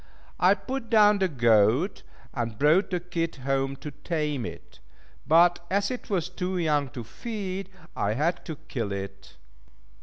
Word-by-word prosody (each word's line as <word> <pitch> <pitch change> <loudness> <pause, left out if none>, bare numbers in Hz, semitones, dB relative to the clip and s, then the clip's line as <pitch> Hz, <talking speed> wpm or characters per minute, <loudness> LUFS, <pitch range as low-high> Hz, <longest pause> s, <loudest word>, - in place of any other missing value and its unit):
I - - +5
put 265 -3 -5
down 210 -2 +6
the 190 - +3
goat, 120 - +3 0.3
and 115 -4 -3
brought 155 - +4
the 180 - -1
kid 170 -1 -3
home 135 0 -1
to 145 +2 -8
tame 150 -3 -2
it; - - -11 0.5
but 175 +2 +5
as 200 +4 +1
it 250 - -6
was 180 -5 0
too 180 +1 -3
young 150 -5 +1
to 120 - -4
feed, 195 - -5 0.3
I 105 - 0
had 155 +9 0
to 160 - -5
kill 115 -6 -3
it. 95 -1 -7
160 Hz, 155 wpm, -27 LUFS, 130-185 Hz, 0.5 s, down